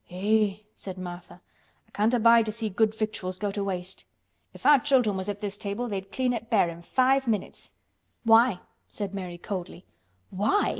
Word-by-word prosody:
"Eh!" 205 +2 +1 0.2
said 190 -1 -8
Martha. 175 -1 -9 0.5
"I - - -30
can't 220 +4 +2
abide 230 -1 +5
to - - -1
see 220 0 -4
good 215 +2 +1
victuals 215 -4 -3
go 205 +1 -2
to 200 0 -3
waste. 185 -1 -4 0.5
If - - -15
our 290 -2 +7
children 250 -7 +2
was 190 +1 -4
at 205 0 -4
this 205 -1 -4
table 205 +5 -3
they'd 195 -3 -5
clean 255 0 0
it 230 -1 -5
bare 200 -7 +3
in 170 0 -9
five 260 +7 +2
minutes." 215 -4 -3 0.5
"Why?" 225 -3 +5 0.3
said 200 -2 -5
Mary 180 -3 -5
coldly. 180 -1 -6 0.5
"Why!" 210 - +1
205 Hz, 180 wpm, -27 LUFS, 190-230 Hz, 0.5 s, our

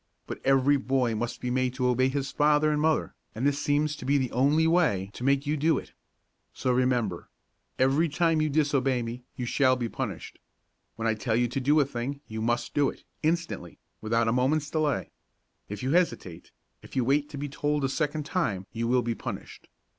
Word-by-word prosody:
But, - - -7
every 135 +1 +4
boy 130 -3 0
must 120 +2 -3
be 125 - -2
made 130 0 0
to 130 -1 -1
obey 130 +1 +3
his 135 0 -2
father 150 +1 +3
and 150 0 0
mother, 160 0 +1 0.2
and 115 +5 -2
this 145 0 +1
seems 150 +1 +1
to - - -9
be 140 +3 +2
the 130 -3 -1
only 145 +6 +3
way 150 - +2
to - - -8
make 140 +1 +2
you 150 +1 0
do 155 +2 +2
it. - - -7 0.6
So 130 - 0
remember! 125 -7 0 0.5
Every 140 +6 +3
time 165 0 +2
you 155 - +1
disobey 140 -4 +1
me 115 +2 -6
you 125 - -4
shall 130 +1 +3
be 120 -2 -2
punished. - - -5 0.6
When 115 0 -2
I 110 - +3
tell 110 +1 -1
you 120 +1 +2
to 130 - -2
do 145 +4 +4
a 145 - +4
thing, 135 +2 -4
you 110 0 -5
must 120 +2 -1
do 145 -1 +3
it, - - -11 0.2
instantly; 160 - -2 0.2
without 115 +1 +1
a - - +3
moment's 140 +4 +1
delay. 155 -3 0 0.6
If 105 +2 -6
you 130 - 0
hesitate, 160 - 0 0.3
if - - -13
you 130 -3 +1
wait 145 +3 +1
to 145 - -8
be 145 +1 -3
told 145 +1 -1
a - - +3
second 150 +1 -1
time, 105 - -1
you 115 0 -2
will 125 0 +2
be 120 - -1
punished. - - -8
135 Hz, 205 wpm, -27 LUFS, 120-150 Hz, 0.6 s, every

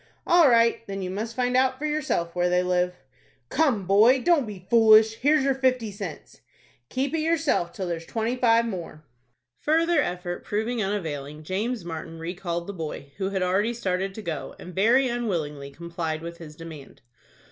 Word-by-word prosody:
"All 340 -4 +6
right. 230 -1 +4
Then 195 -1 -4
you 185 - -3
must 220 +4 -4
find 250 0 0
out 260 0 +3
for 300 - -4
yourself 295 - -1
where 180 0 +2
they 180 0 +2
live." 180 0 0 0.5
"Come, 260 -11 +1
boy, 215 +8 +5
don't 315 -4 +2
be 190 -4 -9
foolish. 220 -1 +6
Here's 295 +3 +3
your 275 0 +2
fifty 255 -4 0
cents." 195 -6 -8 0.5
"Keep 265 +3 -2
it 325 - +1
yourself 315 - +1
till 190 - -5
there's 165 -1 -4
twenty 230 +2 -1
five 230 -2 +3
more." 175 -7 -6 0.6
Further 330 +1 +2
effort 175 -4 -4
proving 220 +3 -2
unavailing, 155 -7 -4
James 205 +4 -2
Martin 165 0 -6
recalled 170 0 -4
the 200 - -6
boy, 155 -5 -6
who 190 -1 -1
had 190 -2 -1
already 200 +6 +1
started 195 -3 -2
to 220 - -7
go, 155 -7 -5
and 180 - -10
very 235 +8 +4
unwillingly 165 - -3
complied 165 +1 -5
with 170 0 -7
his 155 -2 -10
demand. 155 -6 -11
195 Hz, 175 wpm, -25 LUFS, 170-245 Hz, 0.6 s, All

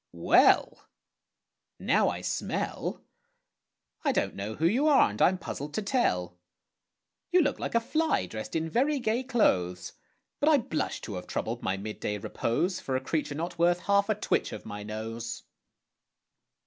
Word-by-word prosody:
Well! 85 0 +4 0.9
Now - - +2
I - - -4
smell, - - -3 1.0
I - - +3
don't - - 0
know 105 +3 -5
who 160 - -1
you 245 - +3
are, 280 - +5
and 105 - -6
I'm 185 - +5
puzzled 150 -4 -6
to 215 - -1
tell. 90 - 0 0.9
You 360 0 +5
look 285 - -1
like - - -3
a - - +6
fly 315 +7 0
dressed 110 +7 -7
in 160 0 0
very 275 - +1
gay 235 -1 0
clothes, 90 - +1 0.5
But 295 - +3
I 305 - +6
blush 160 - -2
to 105 - -6
have 90 - -8
troubled - - -3
my 95 - -1
mid 105 +2 -6
day 105 - -2
repose 170 - -1
For 130 - -3
a - - +2
creature 150 0 -2
not 170 +2 -4
worth 175 +1 +3
half 200 +1 +2
a 215 - +3
twitch 210 - 0
of - - -8
my 105 -1 -6
nose. 115 +2 -5
160 Hz, 165 wpm, -28 LUFS, -, 1.0 s, a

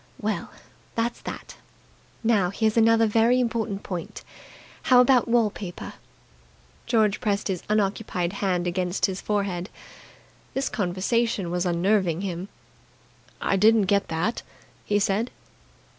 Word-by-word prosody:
Well, - - -2 0.5
that's 235 +1 -1
that. - - -8 0.7
Now, 210 -6 +3
here's 220 +2 0
another 225 0 +5
very 225 +3 +3
important 225 -4 -1
point. 175 -3 -6 0.7
How 250 -1 +7
about 250 -1 +5
wall 230 -3 +3
paper?" 180 -4 -7 0.9
George 215 -4 +2
pressed 205 -1 -1
his 185 -3 -2
unoccupied 200 -3 0
hand 185 -3 -1
against 180 +1 0
his 190 -1 -3
forehead. 200 -3 -2 0.9
This 270 +1 0
conversation 200 0 -1
was 180 +1 0
unnerving 180 0 +1
him. 185 0 -4 0.9
"I 195 - +1
didn't 220 +2 +5
get 200 +1 +1
that," 165 +9 -1 0.4
he 205 - +1
said. 205 +4 +1
205 Hz, 120 wpm, -25 LUFS, 185-225 Hz, 0.9 s, How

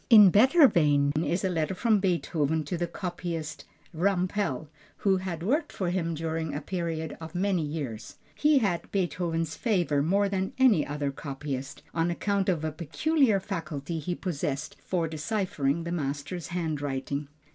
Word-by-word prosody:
In 210 -5 +9
better 265 - +7
vein 145 - +3
is 170 +6 0
a - - +2
letter 170 +1 -1
from 220 +2 +3
Beethoven 160 -4 0
to 150 +5 -3
the 175 0 -1
copyist 170 -3 -5 0.3
Rampel, 180 -3 0 0.4
who 195 -1 +5
had 180 -3 -4
worked 290 - +1
for 180 -3 -2
him 170 -3 -1
during 160 -1 -2
a - - -1
period 165 -3 -3
of 160 +2 -8
many 185 -1 +1
years. 145 -8 -5 0.2
He 300 -1 +4
had 195 -9 0
Beethoven's 170 -4 -1
favor 175 - +1
more 200 +7 +2
than 190 -1 -2
any 245 - +4
other 145 -1 -2
copyist, 140 -1 -5
on 165 +1 +1
account 200 +2 0
of 165 -4 0
a 155 - -1
peculiar 215 - +2
faculty 165 -4 -4
he 175 +4 -3
possessed 150 -5 -3
for 170 -3 -1
deciphering 160 -2 -1
the 170 - -4
master's 145 +1 -3
handwriting. 145 -4 -2
170 Hz, 155 wpm, -28 LUFS, 150-190 Hz, 0.4 s, In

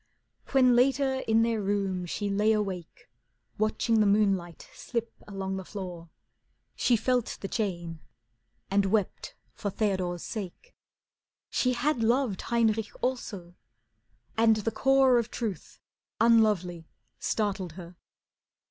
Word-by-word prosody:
When 255 -3 +5
later 265 +1 +2
in 225 0 +4
their 230 -2 0
room 195 -3 -1
she 205 +4 -3
lay 210 +2 +2
awake, 190 -5 -4 0.5
Watching 215 +1 +1
the 210 - +4
moonlight 195 -4 +1
slip 235 -2 -4
along 195 -1 -4
the 190 - -5
floor, 180 -4 -7 0.7
She 245 - +3
felt 245 +1 0
the 195 - -3
chain 175 -7 -3 0.7
and 200 0 +3
wept 205 -1 -1 0.2
for 205 - -3
Theodore's 185 -4 -1
sake. 215 - -7 0.8
She 250 -1 +1
had 250 +1 0
loved 235 -3 +1
Heinrich 225 -2 +2
also, 200 -9 -3 0.8
and 225 0 +5
the 215 +1 -2
core 265 -1 +4
Of 235 -1 -3
truth, 210 -9 -5 0.4
unlovely, 210 -7 +3 0.3
startled 195 -5 -1
her. 175 0 -10
210 Hz, 120 wpm, -28 LUFS, 190-235 Hz, 0.8 s, When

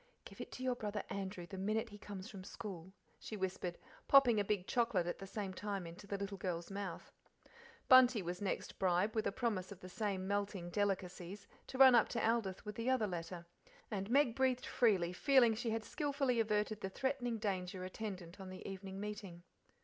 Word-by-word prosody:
"'Give - - -9
it - - -7
to 255 - -6
your 255 -1 +2
brother 210 -3 -3
Andrew 190 -2 -4
the 190 +2 -7
minute 215 +4 0
he 205 -1 -11
comes 200 -2 -7
from 195 -4 -9
school," 185 -3 -7 0.3
she 215 - -6
whispered, 185 -2 -2 0.3
popping 250 -6 +7
a - - +3
big 200 -2 0
chocolate 225 -7 +1
at 175 - -3
the 195 - -7
same 195 -1 -4
time 200 -2 -3
into 170 +4 -10
the 200 - -2
little 200 0 -4
girl's 175 -1 -3
mouth. 195 -4 -5 0.8
Bunty 255 -5 +7
was 175 +2 -4
next 195 - -3
bribed, 185 +3 +2
with 220 - 0
a - - 0
promise 210 -5 -1
of 195 - -9
the 185 - -9
same 190 0 -2
melting 200 -3 -2
delicacies, 195 -1 -2 0.2
to 260 - -6
run 265 -1 +9
up 235 -3 +5
to 230 -2 0
Aldith's 225 -4 0
with 210 -1 -6
the 230 +2 0
other 260 -4 +3
letter, 175 -2 -5 0.5
and 195 -1 -2
Meg 260 -2 +4
breathed 260 -1 +2
freely 195 -8 +3
ago 180 - -10
feeling 260 -5 +6
she 230 +2 -2
had 225 0 -1
skilfully 275 -3 0
averted 215 -1 +1
the 190 - -2
threatening 245 +1 -1
danger 185 -3 -2
attendant 185 -2 -6
on 190 -1 -7
the 185 - -8
evening 195 0 -6
meeting. 200 -4 -6
205 Hz, 200 wpm, -37 LUFS, 185-225 Hz, 0.8 s, run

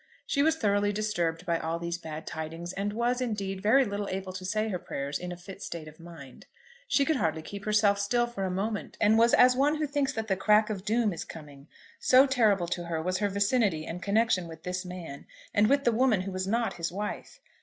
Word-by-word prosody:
She 280 - +1
was 320 +2 +3
thoroughly 205 -6 +1
disturbed 200 -6 -1
by 170 -1 0
all 165 +1 -2
these 170 0 -4
bad 160 -1 -7
tidings, 165 +3 -6
and 200 +1 -2
was, 240 +3 0
indeed, 200 -5 -3
very 255 +7 +4
little 200 0 -3
able 190 0 -4
to 185 0 -7
say 215 +4 -1
her 185 -4 -2
prayers 140 -2 -4
in 180 0 -6
a 175 - -6
fit 195 +2 -11
state 160 -2 -6
of 155 +1 -13
mind. 165 -6 -12 0.4
She 280 - +3
could 315 0 +1
hardly 160 -6 -1
keep 200 +4 -8
herself 210 -1 +3
still 240 +4 +1
for 235 -5 -5
a 190 - -1
moment, 205 +3 -3
and 215 0 +4
was 235 +1 +5
as 250 0 +6
one 285 +4 +3
who 310 0 -1
thinks 285 -1 0
that 220 0 -4
the 195 - +1
crack 210 +3 +3
of 195 -2 -5
doom 220 -2 +1
is 165 - -5
coming; 145 -2 -12 0.3
so 260 +2 +6
terrible 215 -9 +2
to 175 0 -3
her 165 -1 -2
was 185 +3 -1
her 205 -1 +1
vicinity 200 -5 +1
and 175 +2 -6
connection 200 -3 +1
with 160 -1 -11
this 180 0 -3
man, 175 -6 -8 0.3
and 205 +1 +4
with 280 0 +3
the 240 - +3
woman 230 -4 +2
who 195 +1 -5
was 185 0 -3
not 230 +3 0
his 170 -1 -3
wife. 210 - -5
200 Hz, 230 wpm, -28 LUFS, 175-225 Hz, 0.4 s, as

